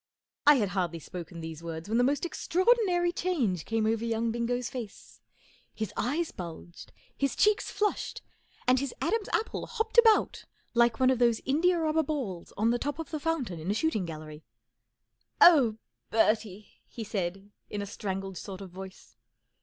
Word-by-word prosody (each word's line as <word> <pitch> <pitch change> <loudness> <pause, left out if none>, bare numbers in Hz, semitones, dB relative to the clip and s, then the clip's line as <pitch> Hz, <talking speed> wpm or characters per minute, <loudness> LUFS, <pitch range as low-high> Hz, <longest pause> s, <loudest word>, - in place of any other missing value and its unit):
I 295 - +9
had 210 -7 +1
hardly 175 -3 -1
spoken 170 +1 -8
these 160 -1 -7
words 165 0 -6
when 225 +3 +1
the - - +4
most 285 +6 +1
extraordinary 365 0 +2
change 265 - -1
came 225 -1 0
over 225 +1 +1
young 230 0 0
Bingo's 240 +1 -1
face. 235 -5 -8 0.5
His 215 -2 -4
eyes 310 +8 -1
bulged, 170 0 -9 0.2
his 275 -1 0
cheeks 425 +1 +3
flushed, 420 0 -2 0.4
and 255 +1 +4
his 275 0 -4
Adam's 450 -2 0
apple 445 - -1
hopped 455 0 +2
about 450 -2 +4 0.3
like 235 -1 +3
one 260 0 +5
of 255 - 0
those 235 -2 +3
india 340 +7 +3
rubber 320 -1 +2
balls 265 - -4
on 220 +3 +3
the 240 - 0
top 290 +2 -3
of 325 -3 -6
the 310 - -2
fountain 285 - -2
in 160 +4 -5
a 205 - +1
shooting 220 - 0
gallery. 155 -1 -8 1.0
11 345 -3 +9
Oh, 225 -5 0 0.3
Bertie! 215 -2 +1
" - - -44
he 230 - -4
said, 195 -1 -4 0.2
in 205 -1 -3
a - - -4
strangled 195 -2 -5
sort 195 -1 -8
of 190 -2 -9
voice. 190 +1 -11
230 Hz, 175 wpm, -29 LUFS, 190-310 Hz, 1.0 s, I